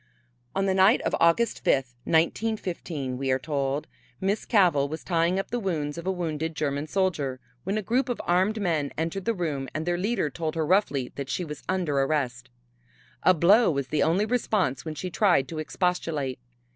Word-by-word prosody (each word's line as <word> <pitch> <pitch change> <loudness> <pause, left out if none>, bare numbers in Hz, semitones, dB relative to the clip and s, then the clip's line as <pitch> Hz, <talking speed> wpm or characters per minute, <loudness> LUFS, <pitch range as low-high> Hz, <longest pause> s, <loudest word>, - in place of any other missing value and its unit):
On 195 0 +1
the 190 - +2
night 190 +6 +5
of - - 0
August 170 +8 +2
fifth, 130 -2 +2
1915, 165 - -1
we 135 -1 -1
are 130 - +3
told, 140 0 -2 0.3
Miss 195 +3 -1
Cavell 170 - +3
was 160 +2 -6
tying 170 +1 +1
up 195 - -3
the 245 - 0
wounds 155 -8 -2
of 170 +2 -7
a - - +2
wounded 160 -3 -3
German 145 0 -2
soldier, 155 -8 -1 0.3
when 195 +3 0
a 215 - -2
group 250 +6 +1
of 245 - -2
armed 190 +5 +2
men 160 -8 0
entered 165 +4 -2
the 230 - +1
room 150 -7 -2
and 155 +1 -2
their 175 0 0
leader 195 - 0
told 160 +3 -3
her 160 -1 0
roughly 150 -8 +1
that 140 -1 -4
she 180 - -2
was 150 -2 -7
under 175 -7 0
arrest. 135 -3 -1 0.7
A 185 - +5
blow 195 +8 +5
was 140 -4 -2
the 155 - +1
only 180 +6 +3
response 210 - 0
when 155 -1 -5
she 180 +4 -5
tried 170 -8 +3
to 160 - -5
expostulate. 155 -6 -1
165 Hz, 190 wpm, -26 LUFS, 145-190 Hz, 0.7 s, night